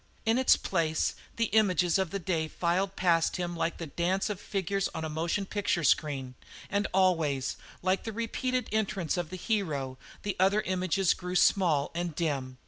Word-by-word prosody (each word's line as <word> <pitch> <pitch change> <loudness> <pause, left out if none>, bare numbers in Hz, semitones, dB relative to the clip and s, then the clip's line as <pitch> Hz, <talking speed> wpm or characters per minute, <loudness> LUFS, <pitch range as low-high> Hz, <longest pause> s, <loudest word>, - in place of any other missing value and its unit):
In 225 +3 +3
its 260 - +6
place 160 -4 0 0.2
the 230 - +1
images 185 -5 +3
of 190 -3 0
the 200 - -3
day 170 -4 -1
filed 185 +4 0
past 170 -2 +2
him 175 -1 -3
like 165 0 -1
the 165 - -5
dance 180 +7 0
of 205 -1 -6
figures 195 -1 -1
on 160 - -3
a - - -3
motion 170 +6 -1
picture 195 -4 -1
screen, 135 -3 +1 0.4
and 205 +1 +1
always, 160 -8 +2 0.3
like 185 +1 +2
the 225 - -4
repeated 240 +2 -2
entrance 200 -6 0
of 175 -3 -3
the 185 - -6
hero, 150 - -2 0.2
the 205 -2 -2
other 195 +3 +4
images 185 0 +1
grew 180 0 -6
small 165 -7 +3
and 170 -2 -3
dim. 135 -6 -2
180 Hz, 175 wpm, -29 LUFS, 160-195 Hz, 0.4 s, its